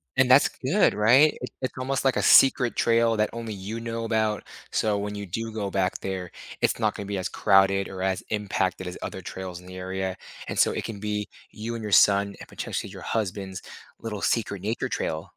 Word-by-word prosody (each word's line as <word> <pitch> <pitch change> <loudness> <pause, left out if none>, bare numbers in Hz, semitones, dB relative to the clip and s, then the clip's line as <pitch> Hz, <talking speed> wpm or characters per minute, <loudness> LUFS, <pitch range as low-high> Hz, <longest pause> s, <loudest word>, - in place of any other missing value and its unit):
And 130 -1 +4
that's 135 - +7
good, 160 +11 +2
right? 125 +9 +5
It - - -4
it's 130 - -2
almost 135 +1 -1
like 135 - +3
a - - +2
secret 130 -2 +6
trail 115 -1 +3
that 105 - +2
only 115 -2 -5
you 100 +4 -5
know 115 0 -4
about, 110 -1 0 0.3
so 105 -2 +1
when 105 +1 -3
you 100 0 -5
do 115 +5 -4
go 105 -3 -3
back 95 -1 0
there, 95 -2 -4 0.3
it's - - +2
not - - +1
gonna 100 - -6
be 100 -1 -2
as 90 - -3
crowded 95 +1 +3
or 95 -1 -7
as 95 -1 -1
impacted 95 -3 -1
as 90 - -6
other - - -5
trails 90 -2 -7
in 90 - -16
the 90 - -9
area, 95 0 -3 0.3
and - - -4
so - - +4
it - - -3
can 105 -3 -6
be 105 0 -2 0.2
you 115 +2 -5
and 115 - -6
your 105 - -4
son, 100 0 +5
and - - -10
potentially - - -4
your - - -10
husband's, 95 -3 -3 0.4
little 105 -3 -5
secret 100 -5 0
nature 110 +3 -2
trail. 80 0 -2
105 Hz, 215 wpm, -26 LUFS, 95-115 Hz, 0.4 s, that's